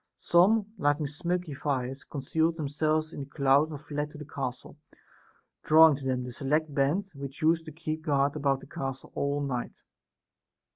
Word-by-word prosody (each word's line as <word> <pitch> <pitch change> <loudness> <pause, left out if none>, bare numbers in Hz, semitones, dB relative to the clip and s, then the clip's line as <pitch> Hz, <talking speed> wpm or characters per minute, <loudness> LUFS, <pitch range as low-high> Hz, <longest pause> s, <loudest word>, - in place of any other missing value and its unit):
Some, 205 +4 +3
lighting 145 0 +2
smoky 175 +2 -2
fire, 130 -2 -2 0.2
concealed 160 +3 0
themselves 155 +1 -1
in - - -7
the 140 - -4
cloud 140 +1 +3
and 150 -3 -6
fled 150 0 -4
to 150 - -12
the 150 - -8
castle, 130 +1 -6 0.8
drawing 160 -1 +7
to 135 - -9
them 130 -1 0
the 125 - -6
select 150 +4 0
band 145 +8 +1
which 140 +2 -7
used 165 +1 +3
to 160 - -8
keep 155 0 -4
guard 145 -2 +1
about 140 -2 0
the - - -11
castle 135 -1 -6
all 140 +1 -1
night. 125 -4 -4
145 Hz, 165 wpm, -28 LUFS, 140-160 Hz, 0.8 s, drawing